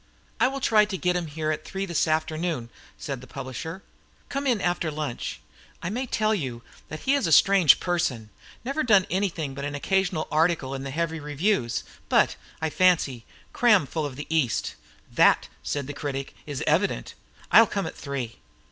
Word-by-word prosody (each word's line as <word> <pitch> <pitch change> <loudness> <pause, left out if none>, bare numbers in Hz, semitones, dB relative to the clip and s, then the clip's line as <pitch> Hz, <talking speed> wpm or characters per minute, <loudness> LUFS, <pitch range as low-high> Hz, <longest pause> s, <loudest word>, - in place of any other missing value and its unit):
"I - - +5
will 275 +1 -4
try 215 -4 +5
to 205 -2 -4
get 180 0 +1
him 175 -2 -1
here 155 +1 -2
at 155 - -3
three 195 0 -4
this 170 -4 0
afternoon," 155 -5 -1 0.3
said 135 -3 -5
the 130 - -12
publisher. 160 +10 -6 0.5
"Come 280 0 -2
in 240 -5 +2
after 175 -3 0
lunch. 150 -4 -4 0.4
I 180 - -2
may 255 +4 -2
tell 215 -1 +1
you 130 - -3 0.3
that 155 - -7
he 270 - +2
is 280 -10 +2
a - - -1
strange 190 -3 +6
person 130 - -1 0.3
never 275 +4 -1
done 205 -8 +5
anything 175 -7 -1
but 140 +1 -6
an 145 0 -3
occasional 185 +1 0
article 155 -4 +1
in 135 - -4
the 135 - -5
heavy 165 +3 -2
reviews, 150 - 0 0.3
but, - - +4 0.3
I 160 - 0
fancy, 160 -10 +2 0.3
cram 210 -10 +4
full 150 +2 -2
of 135 - -9
the 145 - -6
East." 155 -7 0 0.4
"That," - - +4
said 145 -2 -3
the 145 - -6
critic, 140 -1 -4
"is 145 -3 -3
evident. - - +1 0.4
I'll - - +8
come - - -2
at - - -6
three." 135 -5 -5
160 Hz, 185 wpm, -26 LUFS, 140-190 Hz, 0.5 s, I'll